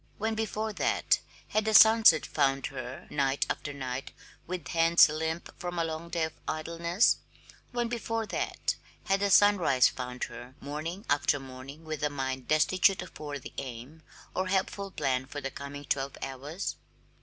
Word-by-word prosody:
When 220 +1 -1
before 220 0 -2
that - - +2 0.3
had 215 0 +1
the 220 0 +2
sunset 220 -8 +8
found 135 0 +1
her 130 +3 -7
night 140 -1 +1
after 145 - -4
night 130 -2 -5 0.4
with 180 -3 -5
hands 165 0 +6
limp 160 +2 -3
from 175 0 -4
a 165 - +2
long 165 +1 -4
day 170 -1 0
of 160 0 -2
idleness? 170 +5 +1 0.5
When 240 -1 -1
before 225 -1 -2
that - - -2 0.3
had 195 0 +1
the 200 0 +1
sunrise 185 -11 +5
found 125 -1 -5
her 120 +2 -7
morning 155 +8 -5
after 145 0 +2
morning 135 +4 -10
with 155 -1 -4
a 150 - +1
mind 130 -2 -3
destitute 180 +5 +3
of 180 - -13
worthy 145 -3 -6
aim 130 +5 -8 0.3
or 185 0 0
helpful 195 +1 -1
plan 130 -7 -1
for 145 - -6
the 135 -1 -4
coming 140 0 -7
twelve 135 0 -2
hours? 140 +8 -4
155 Hz, 160 wpm, -29 LUFS, 135-185 Hz, 0.5 s, sunset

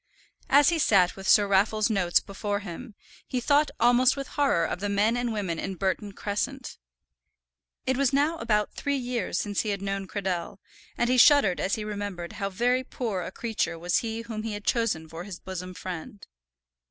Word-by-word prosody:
As 285 +1 +6
he 335 -1 0
sat 190 - +4
with 195 -1 -7
Sir 205 -1 +6
Raffle's 210 +3 +2
notes 180 -4 +3
before 205 +1 -4
him, 205 +4 -8 0.3
he 255 - -1
thought 290 +4 +3
almost 245 +3 +4
with 275 0 -5
horror 280 -12 +2
of - - -3
the 205 +1 -2
men 205 +3 +2
and 245 -1 -1
women 190 -7 -2
in 190 - -4
Burton 195 +2 -2
Crescent. 250 +8 -4 1.1
It 260 0 +1
was 275 -2 +2
now 290 +4 +2
about 210 -5 0
three 285 -1 -1
years 245 -8 -2
since 205 -1 -1
he 215 - -3
had 200 -1 -2
first - - -5
known 195 -1 -3
Cradell, 190 -2 -3 0.4
and 240 - +1
he 255 +1 +3
shuddered 265 - +6
as 195 - 0
he 215 - -4
remembered 205 -5 -5
how 195 -2 -3
very 245 +6 +1
poor 225 -7 -3
a - - -6
creature 225 -7 -2
was 175 +2 0
he 225 -1 -4
whom 225 -2 -5
he 220 -1 -4
had 205 0 -7
chosen 220 -10 0
for 165 +2 -8
his 190 -2 -8
bosom 185 -1 -7
friend. 185 +2 -7
210 Hz, 195 wpm, -27 LUFS, 190-245 Hz, 1.1 s, As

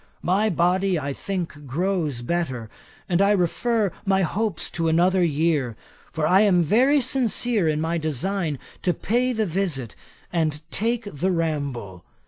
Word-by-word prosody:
My 200 +5 +2
body, 180 +1 +2
I 140 -2 -3
think, 165 -5 -5
grows 155 -4 -1
better, 130 -8 -2 0.4
and 180 0 +2
I 200 - +4
refer 210 +2 +1
my 195 -1 +2
hopes 205 +1 -2
to 165 -1 -1
another 180 +3 +3
year; 150 -6 +1 0.4
for 160 -2 -1
I 185 +5 +5
am 185 -5 +4
very 260 - +4
sincere 240 -5 +1
in 155 -1 +1
my 165 +2 -1
design 155 +2 -2 0.2
to 180 - +1
pay 245 +4 +1
the 220 -3 0
visit, 165 - -2 0.4
and 155 -3 0
take 230 +2 0
the 185 -1 -2
ramble. 140 - -2
175 Hz, 145 wpm, -24 LUFS, 155-200 Hz, 0.4 s, I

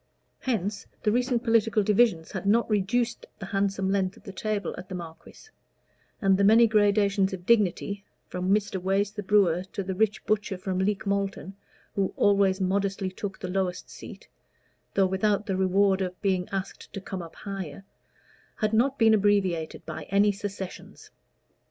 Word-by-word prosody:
Hence 205 -5 -2 0.2
the 210 - +3
recent 245 0 +1
political 225 -3 +3
divisions 205 -5 +2
had - - -4
not 230 +3 +3
reduced 225 +3 0
the 195 - -7
handsome 195 -1 0
length 195 -1 0
of - - -18
the 195 - -9
table 210 0 -2
at 180 - -10
the 185 - -5
Marquis; 170 - -10 0.7
and 195 -3 +3
the - - +3
many 225 +3 +7
gradations 205 -2 +2
of 180 -2 -7
dignity 200 -2 +1 0.2
from 180 +1 -3
Mr. 200 -2 +1
Wace, 195 +2 +1
the 210 0 -5
brewer, 185 -4 +3
to 200 - -3
the 190 0 -3
rich 215 +2 0
butcher 210 -2 0
from 185 -1 -3
Leek 200 +1 0
Malton, 200 -1 -2 0.4
who 195 -2 -1
always 200 -1 +3
modestly 195 0 0
took 195 +1 -6
the 185 - -6
lowest 180 -1 -2
seat, - - -11 0.7
though 195 - +4
without 200 +2 +1
the 195 -4 -1
reward 190 +1 +2
of 180 -1 -3
being 185 -2 0
asked 195 -1 -5
to - - -4
come 190 -1 -6
up 165 -1 -10
higher 195 -4 -6 0.7
had 215 -1 -1
not 260 +5 +2
been 225 -3 +5
abbreviated 190 -7 +1
by 155 0 -6
any 200 +1 +4
secessions. 195 -2 -8
200 Hz, 165 wpm, -27 LUFS, 190-210 Hz, 0.7 s, many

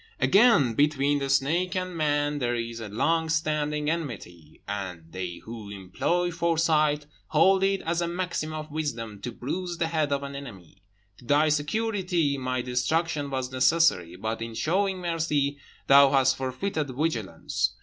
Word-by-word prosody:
"Again, 145 - +5
between 145 +1 +2
the 135 0 -3
snake 160 +8 +1
and 185 -1 -3
man 145 -2 0
there 120 -2 0
is 115 0 -4
a 110 -2 -6
long 160 +10 +1
standing 150 -2 0
enmity, 110 - -5
and 95 -5 -5
they 90 -2 -5
who 110 -2 -8
employ 100 - -1
foresight 160 -3 +1 0.2
hold 190 +5 +4
it 195 0 +1
as 170 +1 -1
a 170 - 0
maxim 175 -3 -3
of 155 -1 -6
wisdom 115 -9 -4
to 120 - -4
bruise 175 +9 -4
the 165 - 0
head 155 -3 0
of 140 0 0
an 140 0 -6
enemy; 100 - -10 0.4
to - - -16
thy 145 +4 +3
security 175 0 0
my 130 -2 -2
destruction 145 +4 -1
was 130 -1 -3
necessary, 130 - +3
but, 110 +4 -4
in 115 0 -5
showing 190 - 0
mercy, 155 -5 -1 0.3
thou 140 0 +7
hast 135 -1 +3
forfeited 145 +5 -2
vigilance. 115 - -1
145 Hz, 155 wpm, -26 LUFS, 125-165 Hz, 0.4 s, thou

